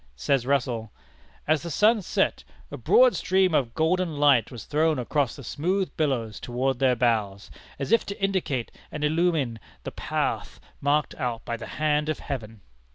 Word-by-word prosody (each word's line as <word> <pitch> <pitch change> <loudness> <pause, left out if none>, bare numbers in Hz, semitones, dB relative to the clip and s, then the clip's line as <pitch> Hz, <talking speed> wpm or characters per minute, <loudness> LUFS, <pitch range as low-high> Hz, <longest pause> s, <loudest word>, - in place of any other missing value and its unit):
Says 125 - 0
Russell: 125 -6 0 0.6
"As 155 -1 +2
the 170 - -6
sun 215 +7 +3
set, - - 0 0.3
a - - -5
broad - - +5
stream 185 -2 +2
of 125 -6 +1
golden 165 0 +1
light 140 -6 +4
was 120 -4 -9
thrown 155 0 +1
across 130 0 0
the 140 - -10
smooth 185 - -1
billows 125 -8 -1
toward 125 +1 -1
their 130 -2 +3
bows, 110 -5 0 0.3
as 140 +7 -4
if 230 - +4
to 200 - -6
indicate 185 - -1 0.2
and 150 - -5
illumine 150 -7 +1 0.2
the - - -5
path - - -3 0.2
marked 145 +1 +1
out 120 -3 -3
by 120 - -2
the 110 -1 -8
hand 150 0 +1
of 155 - -1
Heaven." 115 -6 -6
145 Hz, 165 wpm, -26 LUFS, 120-160 Hz, 0.6 s, broad